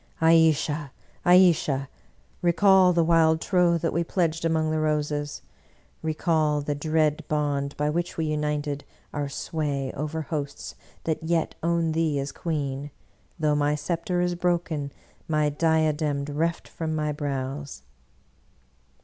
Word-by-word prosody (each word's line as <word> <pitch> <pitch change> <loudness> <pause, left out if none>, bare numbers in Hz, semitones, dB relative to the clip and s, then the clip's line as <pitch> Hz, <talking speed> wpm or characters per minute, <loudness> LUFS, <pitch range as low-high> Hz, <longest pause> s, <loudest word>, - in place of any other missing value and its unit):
Ayesha, 160 -3 +3 0.3
Ayesha! 170 -7 +4 0.5
recall 185 +1 +5
the 170 -1 +3
wild 160 -1 +4
troth 175 -2 +2
that 165 - 0
we 170 - +1
pledged 165 -2 -1
among 160 -1 +1
the 155 - 0
roses; 150 -1 -1 0.6
recall 155 -1 +1
the 145 0 -2
dread 155 0 +1
bond 145 -2 -1
by 150 - 0
which 170 +3 -2
we 160 - 0
united 150 -1 -2 0.3
our 145 -1 -2
sway 140 -2 -3
over 155 +3 -3
hosts 145 -2 -5 0.3
that 160 0 -1
yet 165 0 0
own 170 -1 +1
thee 160 -2 +1
as 140 0 -2
queen, 145 -3 -3 0.5
though 155 -3 +2
my 145 0 +2
scepter 170 +3 -2
is 180 0 +1
broken, 170 -5 -1 0.4
my 150 -1 +2
diadem 155 -2 +1
reft 160 +4 -2
from 160 -1 -4
my 150 -1 -1
brows! 140 - -4
155 Hz, 130 wpm, -26 LUFS, 145-165 Hz, 0.6 s, recall